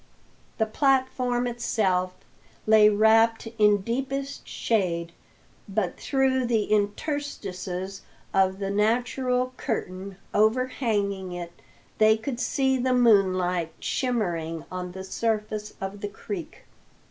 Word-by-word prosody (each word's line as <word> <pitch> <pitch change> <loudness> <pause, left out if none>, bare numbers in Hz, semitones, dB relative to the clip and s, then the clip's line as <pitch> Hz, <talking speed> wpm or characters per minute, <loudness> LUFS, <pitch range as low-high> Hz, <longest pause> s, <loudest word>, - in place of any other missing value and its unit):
The 220 - +2
platform 255 0 +1
itself 190 -6 0 0.5
lay 215 -1 +7
wrapped 225 +2 +4
in 210 -1 +5
deepest 270 +5 -3
shade, 170 -6 -1 0.6
but 195 -3 -1
through 265 -2 +1
the 225 -3 +2
interstices 200 - -2 0.3
of 190 0 +3
the 195 0 -3
natural 250 +4 +1
curtain 190 -5 -4 0.2
overhanging 215 -4 +1
it 175 -1 -6 0.5
they 220 0 +6
could 240 +2 -4
see 265 0 +1
the 255 0 +2
moonlight 185 -7 +3
shimmering 175 -10 -2
on 180 -1 -5
the 190 0 -7
surface 215 +1 -2
of 195 +1 -5
the 205 - -3
creek. 195 -3 -7
215 Hz, 105 wpm, -26 LUFS, 190-245 Hz, 0.6 s, lay